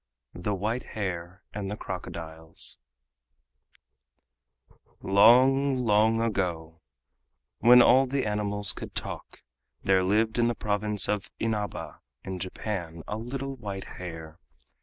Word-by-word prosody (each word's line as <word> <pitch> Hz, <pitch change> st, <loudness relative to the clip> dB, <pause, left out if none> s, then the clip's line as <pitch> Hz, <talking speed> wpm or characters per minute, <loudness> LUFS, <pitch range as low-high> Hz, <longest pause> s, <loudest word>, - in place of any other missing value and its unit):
THE 100 Hz, +4 st, -2 dB
WHITE 110 Hz, +6 st, -2 dB
HARE 90 Hz, -2 st, -4 dB
AND 100 Hz, -1 st, -4 dB
THE 105 Hz, -, -4 dB
CROCODILES 80 Hz, -7 st, -8 dB, 2.2 s
Long, 130 Hz, +7 st, +5 dB
long 110 Hz, -1 st, +3 dB
ago, 85 Hz, -7 st, -2 dB, 0.8 s
when 120 Hz, +2 st, +8 dB
all 135 Hz, +1 st, +5 dB
the 135 Hz, -1 st, -1 dB
animals 105 Hz, -2 st, +1 dB
could -, -, -9 dB
talk, -, -, -7 dB, 0.4 s
there 95 Hz, -1 st, +3 dB
lived 110 Hz, +5 st, +1 dB
in 120 Hz, -, +4 dB
the 120 Hz, -, 0 dB
province 105 Hz, -1 st, 0 dB
of 105 Hz, -2 st, -2 dB
Inaba 110 Hz, -2 st, -3 dB, 0.2 s
in 95 Hz, -1 st, -5 dB
Japan, 90 Hz, -3 st, -5 dB
a 105 Hz, -, -3 dB
little 135 Hz, +4 st, -5 dB
white 100 Hz, -4 st, -6 dB
hare. 80 Hz, -2 st, -8 dB
105 Hz, 115 wpm, -27 LUFS, 90-115 Hz, 2.2 s, when